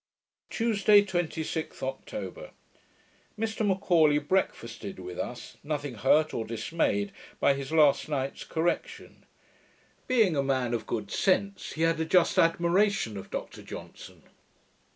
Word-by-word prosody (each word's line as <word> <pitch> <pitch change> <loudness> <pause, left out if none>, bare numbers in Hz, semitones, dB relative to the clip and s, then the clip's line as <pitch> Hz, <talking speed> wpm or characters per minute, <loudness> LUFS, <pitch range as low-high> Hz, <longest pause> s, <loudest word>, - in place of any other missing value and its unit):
Tuesday, 210 -3 +4
26th 160 -5 -3
October 265 - -6 0.8
Mr 220 0 -2
M'Aulay 180 -7 +3
breakfasted 130 - -2
with 90 -1 -8
us, 125 - -6
nothing 145 -3 -3
hurt 140 +7 +3
or 115 - -2
dismayed 110 -3 -1 0.3
by 140 - +4
his 135 +1 -6
last 155 -2 +4
night's 135 -2 -2
correction. 175 - -3 0.8
Being 225 -10 +3
a 140 - +2
man 130 -3 0
of 115 -2 -3
good 105 -3 -3
sense, 195 0 0
he 160 - -1
had 165 0 +2
a 160 - 0
just 175 +1 +3
admiration 170 - +2
of 95 - -8
Dr - - -6
Johnson. - - -10
160 Hz, 125 wpm, -28 LUFS, 130-190 Hz, 0.8 s, Tuesday